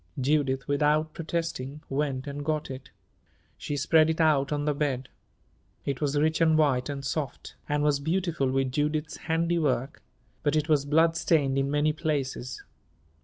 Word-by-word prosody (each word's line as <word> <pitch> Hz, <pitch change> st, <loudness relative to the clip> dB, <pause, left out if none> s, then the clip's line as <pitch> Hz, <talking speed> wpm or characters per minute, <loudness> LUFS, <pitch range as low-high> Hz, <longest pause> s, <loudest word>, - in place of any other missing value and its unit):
Judith, 135 Hz, -1 st, +1 dB
without 150 Hz, +2 st, +2 dB
protesting, 160 Hz, -4 st, -4 dB
went 135 Hz, -2 st, -2 dB
and 145 Hz, 0 st, -5 dB
got 155 Hz, -2 st, -2 dB
it. 130 Hz, 0 st, -8 dB, 0.7 s
She 145 Hz, -, -4 dB
spread 155 Hz, +3 st, +4 dB
it 160 Hz, -, -1 dB
out 150 Hz, -4 st, +3 dB
on 145 Hz, 0 st, -1 dB
the 150 Hz, -, +2 dB
bed. 135 Hz, -3 st, -2 dB, 0.8 s
It 140 Hz, -2 st, -2 dB
was 145 Hz, -1 st, 0 dB
rich 160 Hz, +2 st, +1 dB
and 160 Hz, -1 st, +4 dB
white 140 Hz, -4 st, +2 dB
and 140 Hz, -1 st, -5 dB
soft, 140 Hz, -2 st, -4 dB, 0.2 s
and 145 Hz, 0 st, +1 dB
was 145 Hz, -1 st, +2 dB
beautiful 160 Hz, -3 st, 0 dB
with 135 Hz, 0 st, 0 dB
Judith's 150 Hz, +2 st, -1 dB
handiwork; 160 Hz, -4 st, 0 dB, 0.4 s
but 145 Hz, -1 st, +1 dB
it 155 Hz, 0 st, +1 dB
was 150 Hz, -3 st, +2 dB
bloodstained 155 Hz, -2 st, +2 dB
in 135 Hz, 0 st, 0 dB
many 150 Hz, +1 st, +2 dB
places. 140 Hz, -5 st, -3 dB
145 Hz, 155 wpm, -27 LUFS, 135-155 Hz, 0.8 s, spread